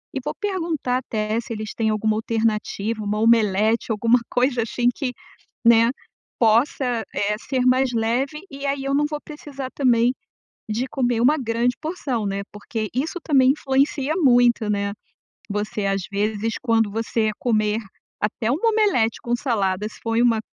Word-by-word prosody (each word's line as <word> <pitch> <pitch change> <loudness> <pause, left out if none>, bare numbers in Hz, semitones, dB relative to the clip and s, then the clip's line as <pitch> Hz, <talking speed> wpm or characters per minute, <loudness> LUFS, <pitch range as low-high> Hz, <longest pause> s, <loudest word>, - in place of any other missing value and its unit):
e - - 0
vou - - -3
perguntar 330 -10 -1
até 215 -2 -2
se 235 - -11
eles 215 -1 -5
têm 220 -1 +1
alguma 215 0 +1
alternativa, 220 -1 -1
uma 210 +1 -1
omelete, 220 0 +3
alguma 230 +3 +3
coisa 250 -1 +1
assim 240 +2 -1
que, 265 -3 -2 0.5
né, 230 0 +6 0.5
possa, 235 +1 +2
eh, 210 +1 0
ser 255 0 -1
mais 255 0 +3
leve 245 +7 -1
e 275 +1 -6
aí 275 0 -1
eu 275 0 0
não 295 - +3
vou 300 -1 -4
precisar 280 -3 -7
também 245 -2 +3 0.6
de 235 +5 -1
comer 245 -3 0
uma 285 +6 +4
grande 240 0 0
porção, 295 -8 -3
né, 195 0 -2
porque 215 +1 -4
isso 310 +7 -2
também 265 -4 +4
influencia 275 +1 0
muito, 245 - +4
né, 200 0 -1 0.6
você 210 0 -2
às 195 -1 0
vezes 210 +2 -1
quando 225 -3 +2
você 225 0 0
comer 215 -2 +1 0.4
até 220 +2 -1
uma 345 - +1
omelete 395 - +2
com 240 0 0
salada, 210 -6 -1
se - - -15
for 225 0 -1
em 235 - +4
uma 230 -2 +3
235 Hz, 160 wpm, -22 LUFS, 215-265 Hz, 0.6 s, né